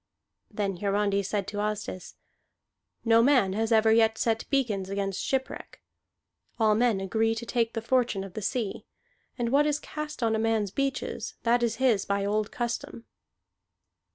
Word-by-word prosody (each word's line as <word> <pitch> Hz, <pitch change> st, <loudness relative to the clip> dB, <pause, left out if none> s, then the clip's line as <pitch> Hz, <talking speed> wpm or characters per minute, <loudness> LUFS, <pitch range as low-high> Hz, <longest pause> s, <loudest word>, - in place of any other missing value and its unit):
Then 200 Hz, -3 st, -2 dB
Hiarandi 200 Hz, +1 st, +1 dB
said 200 Hz, 0 st, -2 dB
to 205 Hz, -, -6 dB
Asdis: 210 Hz, -3 st, -4 dB, 0.9 s
"No 225 Hz, 0 st, +5 dB
man 240 Hz, -7 st, +4 dB
has 225 Hz, +3 st, -1 dB
ever 220 Hz, 0 st, +5 dB
yet 220 Hz, 0 st, +4 dB
set 225 Hz, -1 st, -1 dB
beacons 215 Hz, -9 st, 0 dB
against 195 Hz, -1 st, -2 dB
shipwreck. 265 Hz, -1 st, -3 dB, 0.8 s
All 215 Hz, -1 st, +4 dB
men 225 Hz, -2 st, +2 dB
agree 220 Hz, +4 st, 0 dB
to 230 Hz, +1 st, -5 dB
take 230 Hz, -1 st, 0 dB
the 225 Hz, -, -4 dB
fortune 235 Hz, -5 st, +1 dB
of 195 Hz, -2 st, -9 dB
the 215 Hz, -, -5 dB
sea; 215 Hz, -1 st, -3 dB, 0.5 s
and 240 Hz, -2 st, -1 dB
what 285 Hz, +4 st, +3 dB
is 295 Hz, -1 st, +1 dB
cast 300 Hz, -3 st, -6 dB
on 225 Hz, -1 st, +2 dB
a -, -, 0 dB
man's 220 Hz, -3 st, 0 dB
beaches, 275 Hz, +2 st, -3 dB
that 240 Hz, +1 st, +3 dB
is 230 Hz, -2 st, +1 dB
his 235 Hz, -6 st, +2 dB
by 200 Hz, 0 st, 0 dB
old 210 Hz, +1 st, 0 dB
custom." 235 Hz, -1 st, -4 dB
225 Hz, 160 wpm, -27 LUFS, 200-240 Hz, 0.9 s, No